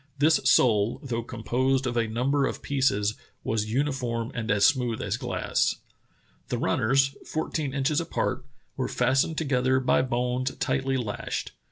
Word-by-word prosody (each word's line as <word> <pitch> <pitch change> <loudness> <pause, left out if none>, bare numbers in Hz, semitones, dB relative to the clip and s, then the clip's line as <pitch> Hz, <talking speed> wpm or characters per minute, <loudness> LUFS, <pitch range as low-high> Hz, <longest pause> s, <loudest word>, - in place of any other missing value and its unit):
This 155 +3 +4
sole, 115 -3 +4
though 120 -4 -2
composed 130 +3 -1
of 120 -1 -2
a 115 -1 +1
number 135 +5 +1
of - - -6
pieces, 115 -7 +1 0.3
was 110 -1 -1
uniform 125 -3 -1
and 115 -2 -4
as 100 0 +4
smooth 125 -5 +2
as - - -1
glass. - - 0 0.7
"The - - -2
runners, 135 +4 +2
fourteen 155 -2 -3
inches 140 +3 +1
apart, 160 -5 -2 0.3
were 130 - -2
fastened 135 +4 +1
together 130 -3 +2
by 130 - +3
bones 125 +1 -1
tightly 135 0 0
lashed. 110 -5 -4
130 Hz, 145 wpm, -26 LUFS, 115-135 Hz, 0.7 s, This